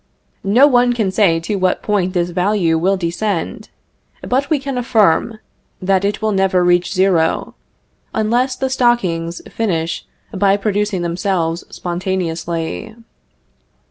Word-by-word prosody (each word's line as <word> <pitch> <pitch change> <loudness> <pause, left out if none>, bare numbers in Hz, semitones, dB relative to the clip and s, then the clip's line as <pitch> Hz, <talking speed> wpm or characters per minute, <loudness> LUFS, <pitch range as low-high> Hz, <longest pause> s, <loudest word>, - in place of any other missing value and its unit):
No 245 +7 +6
one 245 -3 +4
can 215 -5 0
say 185 -5 +3
to 200 +5 -2
what 185 -1 0
point 190 -3 0
this 175 -1 0
value 180 -2 +1
will 190 +4 +2
descend; 175 +1 -3 0.6
but 270 +3 0
we 310 - +3
can 275 -2 -4
affirm, 225 -1 +2 0.4
that 190 0 +1
it 205 +2 -1
will 215 - +1
never 190 -2 +2
reach 175 0 +2
zero, 185 -4 +1 0.6
unless 240 +4 0
the 265 0 -2
stockings 185 -10 0
finish 170 -7 -2 0.3
by 195 0 +3
producing 205 -2 -1
themselves 170 -1 -1
spontaneously. 175 +2 -3
195 Hz, 125 wpm, -17 LUFS, 175-220 Hz, 0.6 s, No